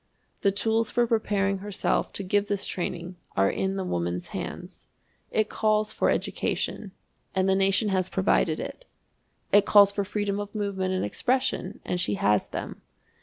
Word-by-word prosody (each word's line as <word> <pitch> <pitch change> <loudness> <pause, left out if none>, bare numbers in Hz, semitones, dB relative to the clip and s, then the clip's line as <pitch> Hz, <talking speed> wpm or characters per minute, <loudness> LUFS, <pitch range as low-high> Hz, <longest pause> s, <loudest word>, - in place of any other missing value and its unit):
The 200 - +3
tools 220 +3 +1
for 240 0 +2
preparing 200 -4 +1
herself 205 0 -1
to 200 - -4
give 205 +2 +1
this 205 -1 -1
training 175 0 -4 0.2
are 95 0 +4
in 190 0 -1
the 195 - -2
woman's 85 - -2
hands. - - -7 0.4
It 215 -1 +1
calls 215 0 +1
for - - +1
education, - - -2 0.4
and 190 0 +2
the 190 - +4
nation 195 +2 +3
has 185 -1 +1
provided 185 -4 +2
it. - - -7 0.7
It 205 0 +5
calls 200 -1 +7
for 200 0 -1
freedom 205 0 -2
of 205 +1 -6
movement 190 -3 -1
and 185 - 0
expression, 255 - -1
and 180 - 0
she 105 - +1
has 105 +1 +2
them. - - -6
195 Hz, 165 wpm, -26 LUFS, 185-210 Hz, 0.7 s, calls